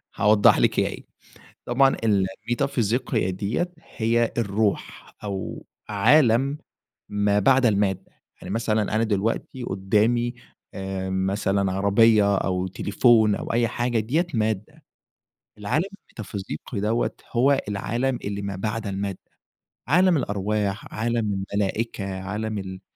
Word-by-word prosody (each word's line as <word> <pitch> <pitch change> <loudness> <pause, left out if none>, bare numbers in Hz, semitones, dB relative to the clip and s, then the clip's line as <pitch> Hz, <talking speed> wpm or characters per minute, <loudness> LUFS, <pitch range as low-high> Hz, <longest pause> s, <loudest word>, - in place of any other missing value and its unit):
هاوضح 105 0 +5
لِك - - +2
هي - - +2
إيه. - - -7 0.6
طبعًا 135 +2 +3
الميتافيزيقية 115 +2 0
دِيَّة 105 - -2 0.3
هي 115 +1 +1
الروح 105 -1 -2
أو 100 -2 -5 0.2
عالم 130 +5 +4 0.5
ما 105 0 +2
بعد 130 +5 +4
المادة. 100 -4 +1 0.3
يعني 95 - -5
مثلًا 110 -1 +1
أنا 110 - +2
دلوقتي 115 +4 -2
قدّامي 110 +5 +1 0.4
آآ، 95 -1 -4
مثلًا 95 0 0
عربيّة 100 +1 +4
أو 90 0 -1
تليفون 105 +2 +3
أو - - -4
أي 115 0 +2
حاجة 120 0 -1
دِيَّة 150 - 0
مادة، 110 -2 -2 0.7
العالم 125 - 0 0.2
الميتافيزيقي 100 +1 -7
دَوَّة 110 +4 0 0.2
هو 135 +3 +3
العالم 120 +6 -1
اللي 100 0 -3
ما 100 -1 -4
بعد 110 +2 -3
المادة. 100 -1 -3 0.7
عالم 180 +1 +4
الأرواح 100 -2 -2
عالم 115 -2 -1 0.2
الملائكة 100 -1 -2
عالم 105 +3 -3
ال 95 -1 -6
105 Hz, 115 wpm, -24 LUFS, 100-120 Hz, 0.7 s, هاوضح